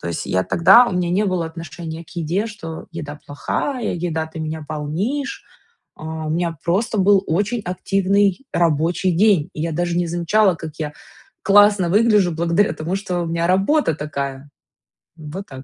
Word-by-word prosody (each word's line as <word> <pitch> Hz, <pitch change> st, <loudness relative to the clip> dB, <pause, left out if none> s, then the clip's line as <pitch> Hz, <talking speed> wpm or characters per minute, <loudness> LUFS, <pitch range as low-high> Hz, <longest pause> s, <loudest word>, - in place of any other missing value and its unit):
То 85 Hz, -, -5 dB
есть 85 Hz, -, -4 dB
я 95 Hz, 0 st, 0 dB
тогда, 195 Hz, +9 st, +6 dB
у 190 Hz, -, -3 dB
меня 180 Hz, -1 st, 0 dB
не 200 Hz, +4 st, +2 dB
было 180 Hz, -4 st, -1 dB
отношения 165 Hz, 0 st, -8 dB
к -, -, -21 dB
еде, 175 Hz, +5 st, -2 dB
что 165 Hz, -7 st, -8 dB
еда 150 Hz, -3 st, -7 dB
плохая, 240 Hz, -, -2 dB
еда, 165 Hz, -2 st, -2 dB
ты 160 Hz, +1 st, -10 dB
меня 155 Hz, 0 st, -4 dB
полнишь. 195 Hz, -, -3 dB, 0.5 s
А, 160 Hz, 0 st, -6 dB
у -, -, -3 dB
меня 165 Hz, 0 st, -1 dB
просто 200 Hz, +6 st, 0 dB
был 195 Hz, 0 st, +4 dB
очень 205 Hz, +8 st, 0 dB
активный 195 Hz, +4 st, 0 dB
рабочий 170 Hz, +3 st, +1 dB
день. 185 Hz, -3 st, +3 dB
И 155 Hz, -, -5 dB
я 165 Hz, -1 st, -2 dB
даже 175 Hz, +1 st, -1 dB
не 175 Hz, -1 st, 0 dB
замечала, 175 Hz, +3 st, +2 dB
как 160 Hz, -1 st, -7 dB
я 150 Hz, -2 st, -4 dB, 0.5 s
классно 205 Hz, -3 st, +5 dB
выгляжу 210 Hz, -3 st, +4 dB
благодаря 170 Hz, +4 st, +1 dB
тому, 165 Hz, +5 st, -3 dB
что 185 Hz, -3 st, -2 dB
у -, -, -2 dB
меня 170 Hz, +1 st, -1 dB
работа 195 Hz, -, +2 dB
такая. 140 Hz, -2 st, -5 dB, 0.7 s
Вот 165 Hz, +5 st, -8 dB
так. 135 Hz, -1 st, -10 dB
175 Hz, 175 wpm, -20 LUFS, 160-195 Hz, 0.7 s, тогда